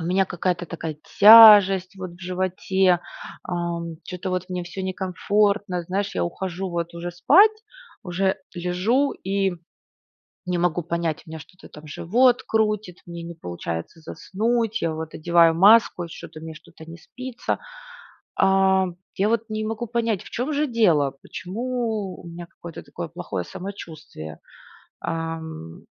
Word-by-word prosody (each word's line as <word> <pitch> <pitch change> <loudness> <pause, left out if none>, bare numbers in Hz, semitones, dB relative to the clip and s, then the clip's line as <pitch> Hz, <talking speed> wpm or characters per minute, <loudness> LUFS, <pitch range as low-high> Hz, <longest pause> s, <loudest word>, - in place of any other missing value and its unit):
У 165 - -5
меня 190 +3 +2
какая-то 175 0 -2
такая 160 -2 -6 0.2
тяжесть 205 -3 +9
вот 185 -1 -6
в 175 - -17
животе, 185 0 +1 0.4
ам, 170 -2 -4
чё-то 180 +1 -5
вот 185 0 -3
мне 180 -1 -3
всё 180 +2 -7
некомфортно. 190 0 0
Знаешь, 195 +4 -3
я 90 - 0
ухожу 185 - -4
вот 170 0 -4
уже 170 +1 -5
спать, 370 - +5 0.5
уже 190 +1 0 0.2
лежу 185 +11 0
и 195 0 -1 1.0
не 180 -1 -1
могу 175 0 0
понять 170 -1 -2
у - - -15
меня 160 0 -7
что-то 180 +4 -15
там 155 0 -13
живот 240 +11 +2
крутит, 210 -4 0
мне 170 0 -7
не 170 0 -7
получается 85 - -6
заснуть, 225 +6 -2
я 165 -1 0
вот 160 0 -6
одеваю 170 0 +4
маску, 200 0 +5
и - - -6
что-то 165 -1 -10
мне 160 0 -8
что-то 165 0 -15
не 165 +1 -10
спится. 255 +8 -5 0.8
А, 190 0 +3 0.3
я 200 +2 +1
вот 225 0 +1
не 215 0 -3
могу 225 +2 -3
понять, 230 -3 -1
в - - -13
чём 255 +6 -2
же 295 +1 +1
дело? 170 - +2
Почему 220 -2 -4
у - - -13
меня 170 0 -8
какое-то 170 -2 -10
такое - - -7
плохое 90 -2 -5
самочувствие, 160 - -9 0.6
ам. 160 - -6
180 Hz, 150 wpm, -23 LUFS, 170-205 Hz, 1.0 s, тяжесть